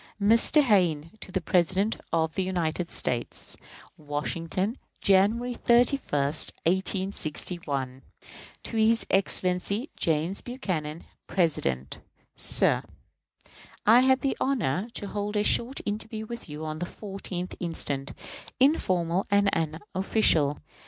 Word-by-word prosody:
_ 200 - +2
Mr. 290 +6 +5
Hayne 170 - +2
to 190 - -9
the 190 0 -1
President 185 +5 +2 0.2
of 160 -1 +1
the 190 - -1
United 175 -2 -2
States. 120 -1 -2 0.4
Washington, 165 - -3 0.2
January 215 +6 +3
31, 240 +3 +3
1861. 155 -2 0 0.6
To 230 - -4
his 225 +1 +4
Excellency 195 +5 0
James 165 +4 +1
Buchanan, 170 - -4 0.2
President. 70 - 0 0.3
Sir: - - +3 1.0
I 225 +3 +7
had 260 +1 +4
the 275 - 0
honor 215 - 0
to - - -1
hold 205 +1 -3
a 205 - +2
short 240 +5 +2
interview 215 +1 -4
with 235 -5 -8
you 150 +1 -6
on 155 0 -5
the 175 - -3
14th 190 -3 -6
inst., 170 -4 -1 0.7
informal 185 - +2
and 200 -1 +4
unofficial. 165 -2 +1
190 Hz, 110 wpm, -27 LUFS, 160-220 Hz, 1.0 s, I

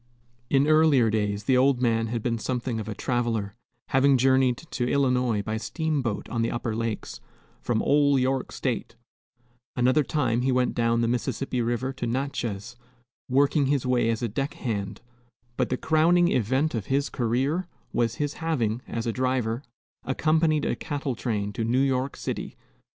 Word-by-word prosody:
In 140 0 +3
earlier 155 -7 +4
days 105 -1 -1
the 130 +4 +2
old 130 0 +4
man 115 -2 +1
had 115 -1 -3
been 115 -2 -1
something 125 -1 -2
of 110 0 -5
a 105 - -4
traveler, 115 -5 -1 0.4
having 135 0 +4
journeyed 130 -1 +3
to 130 -7 -4
Illinois 125 -6 +1
by 110 +1 -2
steamboat 140 - -2
on 115 - -2
the 115 - +1
upper 120 -2 -3
lakes, 115 -1 -4 0.4
from 110 -2 0
"ol' 145 -1 +4
York 130 0 0
State;" - - -3 0.8
another 130 +4 +3
time 125 -5 0
he 130 +1 +1
went 125 0 +1
down 115 0 +1
the 115 - +1
Mississippi 125 +1 -1
River 120 +3 -1
to 125 -3 -4
Natchez, 120 -4 -3 0.5
working 140 +2 +3
his 140 -2 +1
way 125 -2 +2
as 115 +1 -1
a - - +1
deck 135 +7 -3
hand; 105 -6 -4 0.5
but - - 0
the 130 - 0
crowning 170 +4 +3
event 130 +7 +1
of 110 -5 -3
his 140 +1 +1
career 135 +9 -1 0.3
was 115 -1 +1
his 145 -1 -2
having, 125 -9 0
as 115 -1 -4
a 115 - -1
driver, 125 -2 0 0.4
accompanied 155 +3 +1
a - - 0
cattle 145 -3 -3
train 105 -4 -2
to 115 - -2
New 115 +3 +1
York 135 0 0
city. - - -5
125 Hz, 165 wpm, -26 LUFS, 115-140 Hz, 0.8 s, earlier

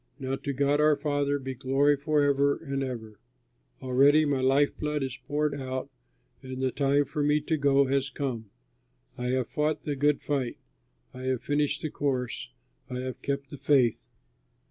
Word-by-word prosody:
Now 135 -2 -2
to 140 - -4
God 140 +2 +2
our 150 0 +5
Father 145 -1 0
be 135 -1 -5
glory 135 +3 +2
forever 140 -1 +2
and 140 -3 -4
ever. 115 -5 -5 0.6
Already 140 +4 +5
my 140 -3 0
life 135 +2 +3
blood 150 -1 -1
is 130 -1 -3
poured 150 0 0
out 130 0 -4 0.5
and 130 0 -7
the 130 -1 0
time 140 +1 +2
for 145 +2 -3
me 150 +1 +3
to 160 +2 0
go 140 -1 +3
has 135 0 0
come. 125 -5 -4 0.7
I 125 - -4
have 130 -1 0
fought 150 +1 -1
the 145 - -2
good 145 +1 +2
fight. 135 -4 -1 0.6
I 130 0 -8
have 130 -2 -1
finished 145 0 0
the 155 - -2
course, 125 - -2 0.4
I 125 - -4
have 130 -1 -6
kept 140 -1 -3
the 145 - -7
faith. 135 -5 +2
140 Hz, 170 wpm, -28 LUFS, 130-145 Hz, 0.7 s, our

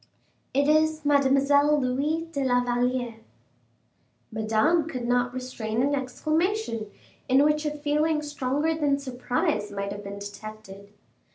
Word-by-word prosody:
It 280 +1 +2
is 310 0 +2
Mademoiselle 285 +1 +4
Louise 285 +5 0
de 280 -3 -2
la 245 -1 +2
Valliere." 245 -1 -1 1.1
Madame 220 +10 +2
could 255 -6 -4
not 245 0 +1
restrain 245 -2 -3
an 285 +1 +1
exclamation, 310 - -1 0.4
in 265 +2 +5
which 300 +1 +2
a - - +2
feeling 300 +1 +1
stronger 290 +2 -1
than 295 -3 +1
surprise 245 -6 -2
might 200 0 -4
have 205 0 -6
been 200 0 -7
detected. 200 0 -9
265 Hz, 125 wpm, -26 LUFS, 230-295 Hz, 1.1 s, in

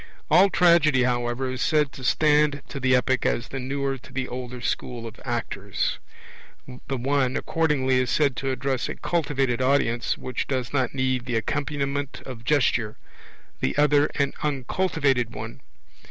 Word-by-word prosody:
All 195 +2 +7
Tragedy, 170 -7 +4
however, 120 +1 -1
is 130 - -5
said 150 -3 +2
to 130 - -10
stand 150 +1 +3
to 140 - -5
the 130 -1 +3
Epic 130 0 +1
as 120 - 0
the 135 - -4
newer 135 +1 -2
to 125 - -15
the 130 -1 -3
older 125 0 -6
school 120 -1 -3
of 115 0 -10
actors. 115 -5 -2 0.9
The 135 - -2
one, 135 +1 +1
accordingly, 140 -5 +1
is 130 -1 0
said 140 0 +2
to 135 - -2
address 130 -1 -1
a - - -4
cultivated 135 -7 0
'audience, 130 -3 +1
which 130 -1 -4
does 130 -2 -2
not 130 -2 0
need 130 -1 0
the 120 - -1
accompaniment 140 +3 -2
of 120 -3 -8
gesture; 125 -6 +1 0.6
the - - -1
other, 145 0 +4
an 140 -1 0
uncultivated 140 -3 0
one. - - -7
130 Hz, 155 wpm, -25 LUFS, 125-145 Hz, 0.9 s, All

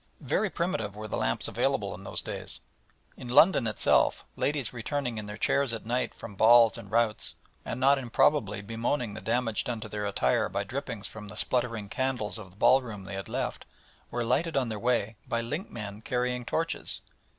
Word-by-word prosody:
Very 215 - +1
primitive 140 - -2
were 110 +1 -6
the - - -3
lamps - - 0
available - - 0
in - - -9
those - - -4
days. - - -5 0.6
In 125 - -8
London 135 0 +6
itself 110 - +3
ladies 140 -5 -1
returning 120 0 -2
in 105 - -6
their 105 +1 -6
chairs 130 +1 +2
at 110 - -8
night 125 +3 -1
from 110 - -8
balls 115 +2 +7
and 115 -4 -7
routs, 115 -1 +1 0.3
and 120 - -4
not 135 +1 +5
improbably 115 -4 +2
bemoaning 115 +2 -1
the 110 - -7
damage 115 -1 0
done 120 -2 -3
to 110 - -5
their 105 -1 -2
attire 65 -11 +2
by 100 +1 -1
drippings 115 -1 -4
from 105 -1 -9
the 105 - -9
spluttering 115 -4 0
candles 120 -2 -2
of 95 -4 -9
the 90 - -21
ballroom 115 -5 +3
they 95 +1 -8
had 95 -2 -5
left, - - -3 0.4
were 120 - -1
lighted 160 +6 +1
on 130 -3 +1
their 110 -2 -3
way 115 -2 +1
by 115 - 0
linkmen 115 - -5
carrying 125 +1 -1
torches. 165 +6 -2
115 Hz, 185 wpm, -29 LUFS, 105-125 Hz, 0.6 s, balls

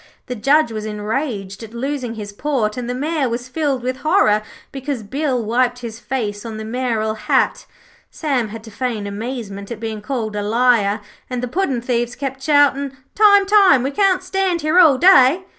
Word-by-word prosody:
The 250 - -5
Judge 275 +3 +3
was 215 -1 -5
enraged 210 -1 -4
at 225 0 -10
losing 255 -2 -3
his 205 -2 -7
port, 225 -4 -1
and 245 -1 -5
the 245 - -2
Mayor 290 0 -1
was 240 +1 -4
filled 275 -2 -1
with 255 +1 -2
horror 215 -9 +3 0.3
because 270 -3 -4
Bill 260 +2 -1
wiped 245 +2 +1
his 225 -1 -7
face 215 -6 -3
on 225 -2 -6
the 220 - -6
mayoral 225 -2 -1
hat. 215 - 0 0.4
Sam 270 -8 -1
had 220 +1 -9
to 220 - -11
feign 225 -2 -3
amazement 200 -1 -6
at 235 - -6
being 220 -2 -5
called 220 -2 -3
a 205 - -1
liar, 220 -1 +2 0.3
and 250 -1 -3
the - - -1
puddin' 270 -4 -1
thieves 240 0 -1
kept 265 -1 -5
shouting: 280 -2 +2 0.2
'Time, 405 -1 +5
time; 390 -10 +5
we 270 - -1
can't 375 +2 +2
stand 370 -2 -1
here 310 +4 +3
all 310 -7 +6
day.' 345 -1 +6
250 Hz, 185 wpm, -19 LUFS, 220-285 Hz, 0.4 s, all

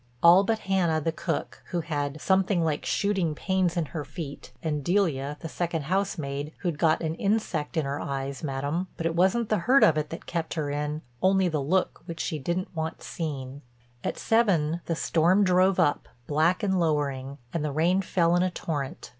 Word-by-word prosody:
All 175 +3 +8
but 225 +2 +1
Hannah, 180 -5 +2
the 165 +2 -1
cook, 165 -1 -4
who 175 -2 -2
had 145 -2 -3
"something 190 0 +2
like 155 -2 -1
shooting 190 -6 +1
pains 185 0 0
in 170 - +1
her 155 -3 -3
feet, 145 -1 -8
and 150 -3 -1
Delia, 150 -6 +1
the 165 - -4
second 165 -1 -2
housemaid, 155 -4 -2
who'd 170 -5 -2
got 160 -2 +3
an 160 0 -1
insect 180 -5 -1
in 155 - +1
her 140 +1 -2
eyes, 135 0 -4
Madam. 145 +5 -2
But 165 - -4
it 165 - +1
wasn't 210 +6 +2
the 215 - +2
hurt 255 +10 +4
of 155 -1 +5
it 150 - -3
that 165 - -7
kept 165 -2 -3
her 150 -3 -2
in, 150 +1 -3 0.2
only 190 -1 +3
the 155 -3 -1
look 180 +7 0
which 165 -1 -6
she 155 - -2
didn't 175 +6 -3
want 160 +1 -4
seen." 140 -4 -5 0.4
At - - -2
seven 175 -8 +2
the 165 - 0
storm 175 +5 +3
drove 185 0 +3
up, 145 -5 +2 0.2
black 160 - +2
and 190 -2 +2
lowering, 140 -4 -1 0.2
and 165 - -1
the 150 - -1
rain 170 +6 +2
fell 175 -2 +2
in 175 - +3
a 185 - +2
torrent. 145 -6 -4
165 Hz, 195 wpm, -27 LUFS, 150-185 Hz, 0.4 s, All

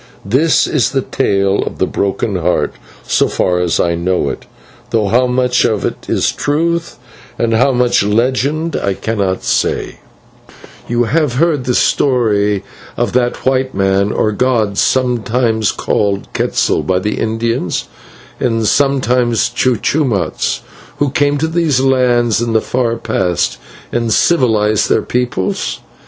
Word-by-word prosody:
This 135 +11 +3
is 135 -3 0
the 135 -2 0
tale 100 0 0
of - - -5
the - - +1
Broken 100 -1 -2
Heart, - - 0 0.3
so - - +2
far 90 -1 0
as 90 -2 0
I 85 - +2
know 90 +2 0
it, - - -7 0.4
though 110 -3 0
how 125 +4 +3
much 125 0 +1
of 105 -2 0
it - - -5
is - - +1
truth 165 +3 -1 0.4
and 115 -1 0
how 125 +5 +3
much 125 -1 +2
is 100 - -1
legend 135 +8 0
I 100 -1 -1
cannot 100 -4 -2
say: - - -1 0.9
"You 120 0 +1
have 145 0 0
heard 150 -2 +1
the 125 - 0
story 105 -7 +1 0.3
of - - -1
that 120 -1 0
white 130 0 0
man, 95 +1 +1
or 110 - 0
god, 110 -3 0
sometimes 120 -3 +1
called 100 -1 -1
Quetzal - - 0
by 95 - 0
the 105 +3 -2
Indians, 115 -3 -2 0.5
and 115 -3 0
sometimes 125 -3 +2
Cucumatz, 125 -1 0 0.4
who 145 -2 0
came 145 +1 +1
to 160 +3 0
these 160 -5 +1
lands 125 -4 +2
in 120 -1 -1
the 110 - +4
far 120 -2 -1
past 95 -7 -1 0.3
and 115 -1 -1
civilised 110 -7 +2
their - - +2
peoples? 120 -6 -2
120 Hz, 145 wpm, -15 LUFS, 105-130 Hz, 0.9 s, the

